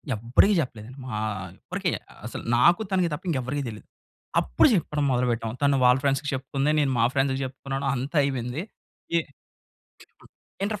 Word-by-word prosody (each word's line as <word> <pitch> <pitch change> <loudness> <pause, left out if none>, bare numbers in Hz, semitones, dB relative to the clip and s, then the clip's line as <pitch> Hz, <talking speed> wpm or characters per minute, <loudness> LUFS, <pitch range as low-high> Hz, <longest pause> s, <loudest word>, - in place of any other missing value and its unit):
ఎవడికీ 120 - +3
చెప్పలేదు. 115 -4 -7 0.2
మా 125 - -6 0.5
ఎవ్వరికి - - -2 0.4
అసలు - - -6
నాకు 170 - +5
తనకి 185 -3 +2
తప్ప 160 +6 -5
ఇంకెవ్వరికీ 140 -1 -1
తెలీదు. 105 -2 -10 0.5
అప్పుడు - - +4
జెప్పడం 150 -5 0
మొదలు 125 0 +2
పెట్టాం. 115 -1 -2
తను 140 -1 +4
వాళ్ళ 125 +1 +6
ఫ్రెండ్స్‌కి 140 +1 +1
చెప్పుకుంది, 135 +2 -1
నేను 140 -2 +2
మా 115 - +5
ఫ్రెండ్స్‌కి 135 0 +1
జెప్పుకున్నాను 135 +1 -4
అంతా 135 +6 -3
అయిపోయింది. 130 +2 -2 0.5
ఇ - - +6 1.5
ఇంటర్ 210 0 -2
135 Hz, 145 wpm, -26 LUFS, 125-150 Hz, 1.5 s, వాళ్ళ